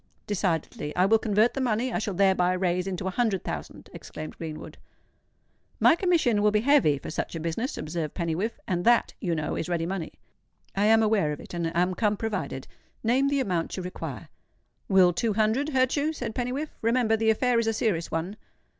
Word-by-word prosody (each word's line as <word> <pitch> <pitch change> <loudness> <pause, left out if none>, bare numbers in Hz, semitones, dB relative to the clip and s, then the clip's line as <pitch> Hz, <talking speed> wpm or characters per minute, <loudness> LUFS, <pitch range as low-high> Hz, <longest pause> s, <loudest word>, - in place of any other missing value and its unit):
"Decidedly. 170 -6 -2
I 180 - +4
will 220 +3 +4
convert 215 +2 +2
the 270 - -2
money 245 0 0
I - - 0
shall 205 -3 -3
thereby 190 -1 +3
raise 180 0 0
into 185 -1 -4
a 190 - -1
hundred 215 -3 0
thousand," 75 -3 -6
exclaimed 155 0 -8
Greenwood. 160 -2 -8 1.0
"My 330 - +6
commission 335 - +2
will 210 - +4
be 210 0 +2
heavy 255 - +4
for - - -7
such 165 - -4
a - - -3
business," 170 - -3
observed 155 -1 -4
Pennywhiffe; 175 +7 -2
"and 175 -1 -1
that, 240 +2 +3
you 175 -5 0
know 155 -1 -2
is 170 - -3
ready 170 -2 0
money." 180 -2 -4 0.6
"I 200 +1 +2
am 225 0 +5
aware 210 -8 +2
of 145 - -7
it, - - -11
and 170 -1 -1
am 180 +1 +2
come 210 +1 0
provided. 195 -12 -3 0.4
Name 255 +5 +3
the 280 -1 +1
amount 180 -8 -2
you 185 - -4
require." 180 - -7 0.6
"Will 185 -2 +5
two 220 +5 0
hundred 220 +7 +1
hurt 260 -3 +2
you?" 300 +2 0
said 255 - -5
Pennywhiffe. 255 +6 -3
"Remember—the 225 -1 +2
affair 240 +2 +2
is 230 - 0
a - - +3
serious 210 -7 -1
one." 170 +6 -3
205 Hz, 195 wpm, -26 LUFS, 175-230 Hz, 1.0 s, My